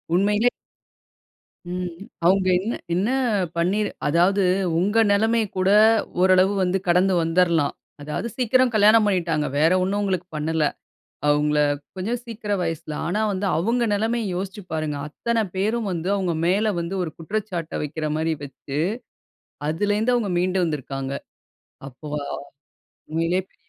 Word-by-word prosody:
உண்மையிலே. 210 +5 +3 1.2
ம். 180 -1 -3 0.4
அவங்க 190 +1 +4
என்ன 215 +6 -3 0.2
என்ன 200 +7 +1 0.5
பண்ணி 180 +5 +1 0.3
அதாவது 180 +5 +3 0.4
உங்க 205 +5 +3
நெலைமை 225 +2 +3
கூட 185 +1 +2 0.5
ஓரளவு 185 +1 +5
வந்து 185 +1 +1
கடந்து 180 +2 +4
வந்துருலாம். 165 -3 +2 0.3
அதாவது 150 +10 -3
சீக்கிரம் 255 0 +3
கல்யாணம் 215 +1 +6
பண்ணிட்டாங்க. 165 -6 0
வேற 160 +3 +4
ஒண்ணும் 200 +2 0
உங்களுக்கு 185 -3 -1
பண்ணல. 155 0 0 0.6
அவங்கள 150 0 +2 0.4
கொஞ்சம் 225 +6 -2
சீக்கிரம் 210 -4 -3
வயசுல. 165 -2 -4
ஆனா, 205 +5 -1
வந்து 195 +1 -2
அவங்க 230 +8 +1
நெலைமய 225 +3 0
யோசிச்சு 195 +2 -5
பாருங்க. 155 -2 -2
அத்தனை 230 +8 -1
பேரும் 215 +3 0
வந்து 170 +1 -3
அவங்க 185 -4 0
மேல 205 +4 +2
வந்து 170 +3 -3
ஒரு 160 - -4
குற்றச்சாட்ட 180 -1 -4
வைக்கிற 155 +1 -3
மாரி 160 0 0
வச்சு 140 +1 -6 0.9
அதிலிருந்து 205 +8 +1
அவங்க 220 -5 0
மீண்டு 185 +1 +1
வந்திருக்கிறாங்க. 135 -3 -4 0.7
அப்ப 135 +2 -13 1.1
உண்மையிலேயே 165 +3 0
பெரிய - - -37
185 Hz, 125 wpm, -23 LUFS, 165-210 Hz, 1.2 s, கல்யாணம்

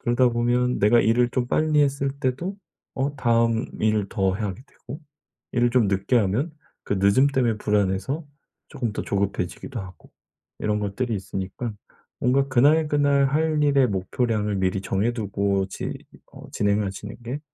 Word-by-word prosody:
그러다 120 +1 +3
보면 120 +1 +1
내가 110 +4 +5
일을 120 +2 +3
좀 125 0 -1
빨리 155 +2 +2
했을 140 -1 0
때도 145 +10 -2 0.4
어 140 +2 -1
다음 115 -2 +2
일을 105 -2 +1
더 95 -3 +1
하게 100 0 -4
되고 140 +6 -11 0.5
일을 120 -1 +2
좀 120 -4 +3
늦게 100 +5 +1
하면 115 - 0 0.3
그 - - -2
늦음 100 +8 +4
때문에 125 -5 +1
불안해서 105 - 0 0.4
쪼금 120 -7 -3
더 - - -3
조급해지기도 100 +4 -3
하고 95 -2 -12 0.5
이런 105 0 -1
것들이 110 +4 -2
있으니까 95 +4 -5 0.5
뭔가 135 +2 +2
'그날, 150 +5 +4
그날 145 -1 +3
할 155 +1 +1
일의 140 -3 +4
목표량을 105 +1 -1
미리 95 0 0
정해두고 100 -2 -1
지 - - -5 0.4
어 - - -12
진행하시는 100 0 -1
게 135 +5 -4
120 Hz, 310 characters per minute, -24 LUFS, 100-135 Hz, 0.5 s, 내가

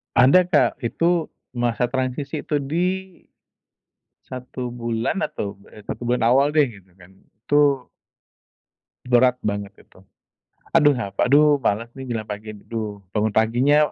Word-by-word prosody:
Ada, 175 +8 +6
Kak, 145 -9 +2
itu 165 +7 0 0.2
masa 120 0 -1
transisi, 135 +3 -2
itu 155 -2 -1
di, 160 +6 -1 1.4
1 125 0 -6
bulan 120 - -2
atau 100 -1 -5 0.2
eee, 105 - -12
1 120 - -5
bulan 125 +1 0
awal 135 +4 +4
deh 155 -2 +5
gitu 100 -4 -16
kan, 90 -1 -16
itu 140 +6 0 1.2
Berat 125 0 +4
banget 100 -1 -3
itu. 95 - -21 0.7
Aduh 150 -3 +5
a 120 -5 -3 0.2
aduh, 145 +2 +5
malas 115 -1 -1
nih 135 - -7
jalan 110 -1 -4
pagi. 105 +1 -6
Duh, 105 -1 -6
bangun 105 +1 0
paginya, 120 +6 +3
125 Hz, 135 wpm, -22 LUFS, 110-145 Hz, 1.4 s, Ada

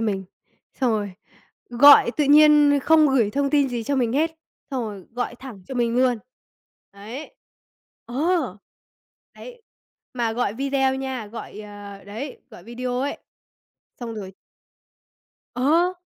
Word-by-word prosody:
mình, 200 -4 -2 0.5
xong 255 -3 0
rồi 205 -3 -2 0.6
gọi 250 0 +7
tự 300 - +2
nhiên 295 0 +6
không 310 -1 +5
gửi 235 -6 +2
thông 280 +2 -1
tin 285 -3 +3
gì 240 -2 -3
cho 280 +4 -1
mình 240 -3 0
hết, 315 +4 +1 0.4
xong 260 -3 -2
rồi 200 -4 -8
gọi 245 0 -3
thẳng 245 -8 -11
cho 265 - -6
mình 240 -1 0
luôn. 250 -2 +2 0.7
Đấy. 220 +9 -9 0.7
Ờ. 260 +7 -2 1.1
Đấy, 485 -1 -12 0.5
mà 235 -3 -1
gọi 235 -4 -1
video 270 +1 0
nha, 265 -4 -5
gọi, 210 -1 -9
ờ, 205 -1 -10
đấy, 230 +8 -7
gọi 175 - -14
video 245 +3 -4
ấy. 280 +2 -2 0.8
Xong 230 -2 -5
rồi 195 -3 -7 1.2
Ờ. 320 +8 +2
250 Hz, 140 wpm, -23 LUFS, 220-280 Hz, 1.2 s, gọi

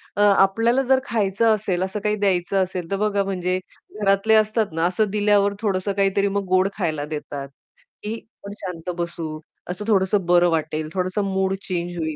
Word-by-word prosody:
अ, 205 - 0
आपल्याला 205 +5 +4
जर 265 0 +3
खायचं 220 -1 +2
असेल, 190 -4 -2
असं 190 +2 -3
काही 210 0 +1
द्यायचं 190 -1 +1
असेल, 180 -2 -5
तर - - +2
बघा 205 -1 +1
म्हणजे 185 -1 -1 0.4
घरातले 200 +2 +3
असतात 215 0 +2
ना, 165 +1 0
असं 195 +4 +1
दिल्यावर 205 -1 +3
थोडसं 200 -2 0
काहीतरी 200 0 +2
मग 200 0 -1
गोड 185 +1 +3
खायला 155 -6 -1
देतात, 150 -2 -6 0.6
की 215 +2 -3 0.3
आपण 200 0 -7
शांत 180 -2 -6
बसू, 170 -2 -4 0.3
असं 195 +4 -4
थोडंसं 195 -2 +2
बरं 175 0 +4
वाटेल, 155 -1 -1
थोडसं 185 +2 -1
मूड 190 0 0
चेंज 175 -1 -3
होईल. 160 -2 -2
195 Hz, 175 wpm, -22 LUFS, 175-205 Hz, 0.6 s, आपल्याला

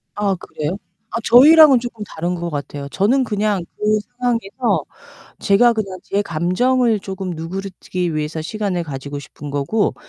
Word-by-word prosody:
아 200 -2 0
그래요? 160 +1 -5 0.3
아 - - -3
저희랑은 285 +2 +8
쪼끔 230 -3 -6
다른 175 +1 -3
것 170 0 -4
같아요. 145 -1 -5
저는 245 - +2
그냥 210 -4 -1
그 215 0 +2 0.2
상황에서 235 -1 0 0.6
제가 235 +4 +4
그냥 195 -4 -4
제 200 +1 -1
감정을 215 +7 +1
쪼금 190 -1 -5
누그르뜨리기 180 0 -4
위해서 155 +1 -3
시간을 195 -1 -2
가지고 140 0 -6
싶은 145 +1 -9
거고 145 +10 0
195 Hz, 325 characters per minute, -19 LUFS, 170-225 Hz, 0.6 s, 저희랑은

